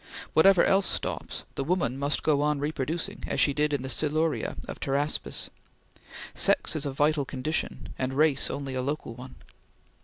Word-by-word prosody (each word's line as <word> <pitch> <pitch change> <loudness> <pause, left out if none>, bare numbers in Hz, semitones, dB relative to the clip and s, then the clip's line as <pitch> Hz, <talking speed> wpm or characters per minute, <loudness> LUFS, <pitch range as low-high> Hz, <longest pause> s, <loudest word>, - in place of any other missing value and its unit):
Whatever 180 +2 +6
else 195 0 +3
stops, - - -2
the 135 - -2
woman 165 -5 0
must 140 +1 0
go 145 -2 +3
on 150 0 +2
reproducing, 155 +2 -3
as - - -1
she 140 - +4
did 150 +1 +1
in 140 -3 -1
the - - -4
Siluria 155 +4 0
of - - -7
Pteraspis; 140 +2 -1 0.8
sex - - +3
is 150 -2 -1
a - - -2
vital 145 +2 +2
condition, 135 +4 -3
and 130 0 -1
race 150 -2 +3
only 140 -1 -4
a 130 - -1
local 140 -2 -3
one. 125 +2 -11
145 Hz, 165 wpm, -27 LUFS, 135-155 Hz, 0.8 s, Whatever